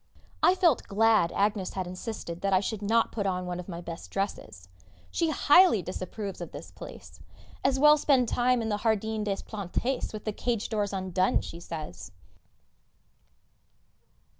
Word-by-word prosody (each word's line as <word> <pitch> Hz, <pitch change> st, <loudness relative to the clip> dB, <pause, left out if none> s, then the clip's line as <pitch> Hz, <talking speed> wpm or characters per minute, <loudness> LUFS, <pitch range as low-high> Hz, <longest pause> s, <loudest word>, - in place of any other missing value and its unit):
I 365 Hz, -, +5 dB
felt 340 Hz, -8 st, +2 dB
glad 215 Hz, -3 st, +3 dB
Agnès 200 Hz, -1 st, 0 dB
had 185 Hz, -1 st, -3 dB
insisted 180 Hz, -1 st, -6 dB
that 195 Hz, -1 st, +1 dB
I 185 Hz, -, +5 dB
should 205 Hz, +2 st, -3 dB
not 225 Hz, +3 st, +2 dB
put 205 Hz, -3 st, -2 dB
on 180 Hz, -1 st, -1 dB
one 180 Hz, 0 st, -4 dB
of 180 Hz, -, -8 dB
my 170 Hz, -1 st, -6 dB
best 170 Hz, -1 st, -8 dB
dresses. 145 Hz, -, -4 dB, 0.4 s
She 330 Hz, -, +1 dB
highly 300 Hz, -, +5 dB
disapproves 190 Hz, +2 st, -5 dB
of -, -, -6 dB
this -, -, -9 dB
place. -, -, -11 dB, 0.4 s
As 270 Hz, 0 st, +2 dB
well 300 Hz, +2 st, +7 dB
spend 265 Hz, -4 st, +3 dB
the -, -, -3 dB
time 245 Hz, -1 st, +2 dB
in 220 Hz, -, -2 dB
the 210 Hz, -, 0 dB
Jardin 220 Hz, 0 st, 0 dB
des 200 Hz, -2 st, -2 dB
Plantes 220 Hz, +5 st, -3 dB
with 215 Hz, -1 st, -8 dB
the 215 Hz, -, -1 dB
cage 230 Hz, -1 st, -2 dB
doors 210 Hz, -3 st, -1 dB
undone, 185 Hz, -1 st, +1 dB
she 170 Hz, -, -8 dB
says! 150 Hz, -, -7 dB
205 Hz, 165 wpm, -28 LUFS, 185-230 Hz, 0.4 s, well